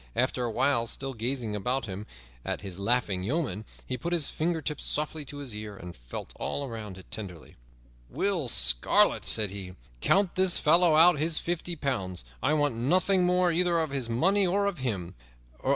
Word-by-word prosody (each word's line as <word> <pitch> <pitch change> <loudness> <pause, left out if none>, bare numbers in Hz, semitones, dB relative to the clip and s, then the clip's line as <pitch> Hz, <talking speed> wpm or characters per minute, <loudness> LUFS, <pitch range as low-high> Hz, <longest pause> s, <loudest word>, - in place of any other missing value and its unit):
After 130 0 0
a - - -1
while, 125 -1 +2
still 135 +3 -1
gazing 120 -2 -3
about 125 +6 -1
him 100 +1 -7 0.4
at - - -3
his 95 -2 -7
laughing 100 -3 +1
yeomen, 110 - -2 0.2
he 130 -1 -4
put 170 +7 -2
his 165 -5 0
fingertips 160 -2 -2
softly 150 +1 -2
to 145 - -9
his 140 -5 -6
ear 105 -1 -7
and 90 -1 -9
felt - - -8
all 140 - -2
around 110 -5 -7
it 95 - -14
tenderly. 90 -7 -8 0.5
"Will 180 - 0
Scarlet," - - +4
said 105 -3 +3
he, 95 -2 -7 0.2
"count 195 - +3
this 185 -1 +2
fellow 165 +1 +4
out 165 -1 +6
his 160 +1 +2
fifty 175 0 -2
pounds; 100 - -3 0.2
I 155 - +2
want 145 -3 +2
nothing 180 +10 +2
more 180 0 +3
either 175 0 +2
of 160 -3 0
his 130 -4 -2
money 190 - +3
or 200 +3 +1
of 200 -6 -2
him. 100 -9 -3
135 Hz, 180 wpm, -28 LUFS, 105-170 Hz, 0.5 s, out